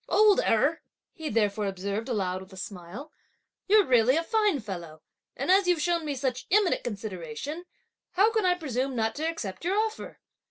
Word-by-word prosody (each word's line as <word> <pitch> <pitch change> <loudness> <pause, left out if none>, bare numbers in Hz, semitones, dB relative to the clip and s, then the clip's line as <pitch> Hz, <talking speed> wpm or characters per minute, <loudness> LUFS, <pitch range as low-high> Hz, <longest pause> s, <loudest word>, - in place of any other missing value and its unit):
"Old 425 -1 +5
Erh," 280 +9 +2 0.3
he 315 -1 -5
therefore 210 -2 +1
observed 200 +5 -3
aloud 190 -5 -1
with 190 +1 -13
a 190 - -12
smile, 200 - -8 0.6
"you're 415 0 +5
really 250 0 +4
a 330 - +1
fine 420 -5 +1
fellow, 175 -8 -8 0.3
and - - 0
as 385 0 +4
you've 355 -2 +3
shown 335 +1 0
me 290 -2 -2
such 255 -1 -3
eminent 400 -1 +3
consideration, 210 - -6 0.5
how 410 +4 +4
can 440 -2 +1
I 360 -1 +3
presume 270 -5 -2
not 225 -1 0
to 315 +2 -1
accept 210 - -6
your 375 +4 0
offer! 440 0 -3
260 Hz, 175 wpm, -27 LUFS, -, 0.6 s, Old